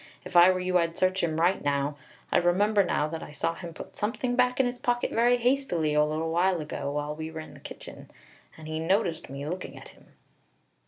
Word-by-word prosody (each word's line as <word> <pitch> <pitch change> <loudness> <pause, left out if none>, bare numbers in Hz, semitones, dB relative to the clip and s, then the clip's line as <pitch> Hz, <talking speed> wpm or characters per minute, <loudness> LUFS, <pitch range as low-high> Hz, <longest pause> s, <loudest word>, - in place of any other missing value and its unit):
If - - -9
I 175 +1 +9
were 185 0 +2
you 180 0 +2
I'd 165 -1 -1
search 185 +1 +1
him 160 -2 -1
right 180 +3 +2
now. 145 0 0 0.4
I - - +4
remember 200 +4 +3
now 150 -4 0
that 165 0 -5
I - - -9
saw 150 +3 -1
him 170 0 -8
put 160 - -10
something 245 +3 -1
back 250 0 +2
in 265 - +4
his 245 0 -3
pocket 245 0 0
very 240 +2 +3
hastily 240 - +1
a 150 0 +4
little 155 +2 -1
while 180 +1 +2
ago, 150 -2 -4
when 150 +1 -3
we 160 0 -5
were 160 0 -7
in 155 - -11
the - - -13
kitchen, - - -10 0.5
and 155 -1 -10
he 155 0 -3
noticed 170 -1 0
me 140 +1 -6
looking 180 +3 -5
at - - -11
him." - - -20
175 Hz, 225 wpm, -27 LUFS, 155-205 Hz, 0.5 s, I